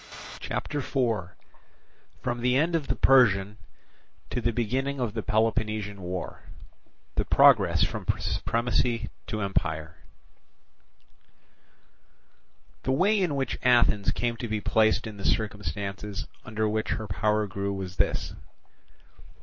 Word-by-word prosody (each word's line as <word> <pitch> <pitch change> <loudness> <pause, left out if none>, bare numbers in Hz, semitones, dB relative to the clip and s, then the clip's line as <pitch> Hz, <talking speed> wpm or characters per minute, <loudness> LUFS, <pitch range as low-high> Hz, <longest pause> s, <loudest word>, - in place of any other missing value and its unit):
CHAPTER 145 - -3
IV 115 - -1 0.9
From 120 -1 -2
the 125 +1 +3
end 165 +4 +2
of 150 -4 -1
the - - 0
Persian 105 -6 +4 0.7
to 125 - -1
the 120 +1 +1
beginning 130 +5 -1
of 120 -5 -1
the 110 - -2
Peloponnesian 110 -2 0
War—The 90 0 -7
Progress - - +5
from - - -3
Supremacy 115 0 0 0.2
to 110 - -3
Empire 80 -5 -2 2.8
The 130 - -1
way 200 +10 +3
in 175 -7 0
which 135 -3 -2
Athens 120 -5 +4
came 120 -1 -1
to 120 - -4
be 110 -1 -1
placed 110 +2 +2
in 110 -2 -7
the 100 - -8
circumstances 100 0 -2 0.2
under 110 -1 -1
which 110 0 -1
her 110 - -4
power 105 +2 +1
grew 100 0 -3
was 95 -1 -5
this. - - 0
110 Hz, 120 wpm, -27 LUFS, 100-125 Hz, 2.8 s, Progress